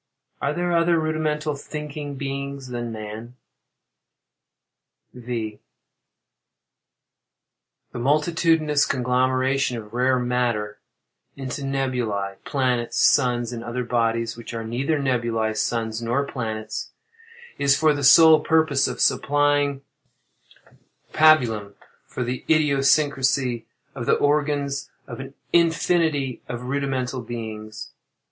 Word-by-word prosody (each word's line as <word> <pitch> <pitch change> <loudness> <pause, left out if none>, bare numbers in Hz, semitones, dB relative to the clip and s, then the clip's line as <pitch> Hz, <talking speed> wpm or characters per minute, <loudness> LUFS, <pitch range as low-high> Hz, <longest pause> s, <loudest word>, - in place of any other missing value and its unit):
Are 140 - 0
there 175 +2 -1
other 170 0 +3
rudimental 155 -1 -1
thinking 150 0 -6
beings 140 -1 -5
than 120 -1 -4
man? 110 +2 -8 1.8
V. 115 -4 -5 2.3
The - - -6
multitudinous 155 +2 +2
conglomeration 130 +1 +1
of 105 -1 -10
rare 130 +1 +2
matter 120 -4 -1 0.6
into 135 +1 -5
nebulæ, 125 -8 -2
planets, 125 -4 -1
suns, 125 -3 +3
and 115 -1 -6
other 120 +2 -3
bodies 115 -1 0
which 115 0 -8
are 115 - -4
neither 130 +7 -1
nebulæ, 115 -5 0
suns, 115 -1 -2
nor 120 +5 0
planets, 110 -5 -5 0.7
is 140 -1 +4
for 155 0 +4
the 145 -1 -4
sole 155 +3 +8
purpose 155 -3 +2
of 125 -1 -5
supplying 145 +1 +2 1.3
pabulum 120 -10 +4 0.3
for 125 - -4
the 125 +1 -4
idiosyncrasy 140 -4 +2 0.3
of 120 -3 -6
the - - +4
organs 145 -1 0 0.2
of - - -8
an 135 +1 -9 0.2
infinity 165 -5 +2
of 120 0 -5
rudimental 130 -1 -2
beings. 110 -2 -7
130 Hz, 105 wpm, -23 LUFS, 120-145 Hz, 2.3 s, sole